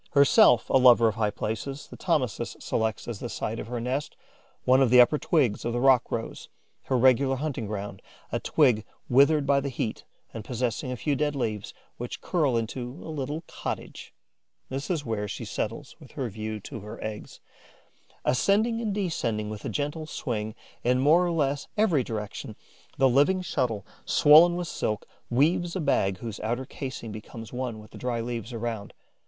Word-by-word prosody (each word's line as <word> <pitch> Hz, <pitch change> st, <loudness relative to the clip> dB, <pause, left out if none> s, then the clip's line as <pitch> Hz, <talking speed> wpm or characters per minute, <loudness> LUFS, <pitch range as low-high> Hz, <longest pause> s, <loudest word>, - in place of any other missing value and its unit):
Herself 140 Hz, -4 st, +6 dB
a 135 Hz, -, +6 dB
lover 120 Hz, -3 st, +7 dB
of -, -, -3 dB
high 105 Hz, -1 st, 0 dB
places, 115 Hz, +7 st, -4 dB
the -, -, -12 dB
Thomisus 130 Hz, -, -1 dB
selects 110 Hz, -1 st, -2 dB
as 115 Hz, -4 st, -5 dB
the 120 Hz, -, -5 dB
site 115 Hz, 0 st, -3 dB
of -, -, -6 dB
her 120 Hz, 0 st, -3 dB
nest 130 Hz, +5 st, -3 dB, 0.5 s
one 130 Hz, +1 st, +5 dB
of 130 Hz, -, +4 dB
the 125 Hz, +1 st, +7 dB
upper 135 Hz, +5 st, +6 dB
twigs 130 Hz, -11 st, +1 dB
of 120 Hz, -, -2 dB
the 120 Hz, -, 0 dB
rock 130 Hz, -1 st, +4 dB
rose, 115 Hz, -, -4 dB, 0.4 s
her 130 Hz, -, +1 dB
regular 130 Hz, +2 st, +4 dB
hunting 135 Hz, -5 st, -3 dB
ground, 100 Hz, -2 st, -5 dB, 0.3 s
a -, -, 0 dB
twig 110 Hz, -4 st, +3 dB, 0.3 s
withered 140 Hz, +3 st, +5 dB
by 140 Hz, 0 st, +4 dB
the 140 Hz, 0 st, -3 dB
heat 115 Hz, -3 st, -3 dB, 0.3 s
and 110 Hz, -, -6 dB
possessing 125 Hz, +2 st, -2 dB
a 125 Hz, -, -3 dB
few 145 Hz, +4 st, 0 dB
dead 145 Hz, +1 st, 0 dB
leaves, 110 Hz, -6 st, -3 dB, 0.2 s
which 120 Hz, 0 st, -6 dB
curl 150 Hz, -9 st, +1 dB
into 115 Hz, +2 st, -3 dB, 0.2 s
a 160 Hz, -, -5 dB
little 150 Hz, +3 st, -4 dB
cottage. -, -, -6 dB, 0.6 s
This 135 Hz, +2 st, -4 dB
is 165 Hz, -5 st, -1 dB
where 105 Hz, -3 st, -2 dB
she -, -, -5 dB
settles -, -, -4 dB
with -, -, -16 dB
a 130 Hz, -3 st, -2 dB
view 110 Hz, +1 st, -5 dB
to 115 Hz, -, -7 dB
her 105 Hz, +2 st, -9 dB
eggs. 110 Hz, -1 st, -7 dB, 0.9 s
Ascending 220 Hz, -, +2 dB
and 210 Hz, -4 st, -2 dB
descending 115 Hz, -, -1 dB
with 105 Hz, -1 st, -7 dB
a -, -, -2 dB
gentle 150 Hz, +2 st, -3 dB
swing 110 Hz, -8 st, -4 dB, 0.3 s
in 125 Hz, +1 st, +3 dB
more 150 Hz, +7 st, +5 dB
or 175 Hz, -, 0 dB
less 145 Hz, -3 st, 0 dB
every 180 Hz, -, +3 dB
direction, 105 Hz, -3 st, -5 dB, 0.4 s
the 135 Hz, -, +5 dB
living 145 Hz, +9 st, +3 dB
shuttle, 120 Hz, -, -1 dB, 0.2 s
swollen 160 Hz, +4 st, +7 dB
with 175 Hz, -1 st, -3 dB
silk, 105 Hz, -8 st, -3 dB, 0.2 s
weaves 170 Hz, +8 st, +2 dB
a -, -, -1 dB
bag 95 Hz, -, +1 dB
whose 110 Hz, +1 st, -6 dB
outer 120 Hz, +4 st, -2 dB
casing 130 Hz, -4 st, -6 dB
becomes 110 Hz, +2 st, -9 dB
one 125 Hz, -3 st, -3 dB
with 105 Hz, 0 st, -13 dB
the -, -, -11 dB
dry 125 Hz, -2 st, -2 dB
leaves 115 Hz, 0 st, -4 dB
around. 115 Hz, -3 st, -4 dB
125 Hz, 180 wpm, -27 LUFS, 110-145 Hz, 0.9 s, lover